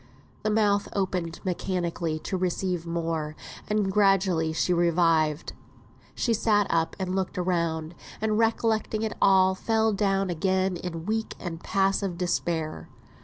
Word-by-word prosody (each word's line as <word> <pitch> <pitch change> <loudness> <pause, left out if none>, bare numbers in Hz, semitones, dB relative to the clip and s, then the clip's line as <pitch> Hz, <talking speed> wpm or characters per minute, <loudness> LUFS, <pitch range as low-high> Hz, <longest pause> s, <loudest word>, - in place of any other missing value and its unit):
The 215 - 0
mouth 210 -2 +2
opened 180 -4 -2
mechanically 175 -3 -2
to - - -2
receive 180 -1 -1
more, 165 -2 -2 0.3
and 210 -2 +1
gradually 190 -5 +3
she 160 +3 +1
revived. 165 -3 +2 0.6
She 235 - +1
sat 210 -2 +3
up 165 -1 +1
and 185 -1 -3
looked 190 0 -2
round; 170 -3 -1 0.3
and 215 0 0
recollecting 225 -1 +1
all, 190 -1 +5
fell 220 +2 +1
down 195 -1 +1
again 185 +1 0
in 165 -2 -6
weak 220 +2 -2
and 165 -2 -6
passive 195 -2 0
despair. 170 -3 -2
185 Hz, 125 wpm, -26 LUFS, 170-200 Hz, 0.6 s, all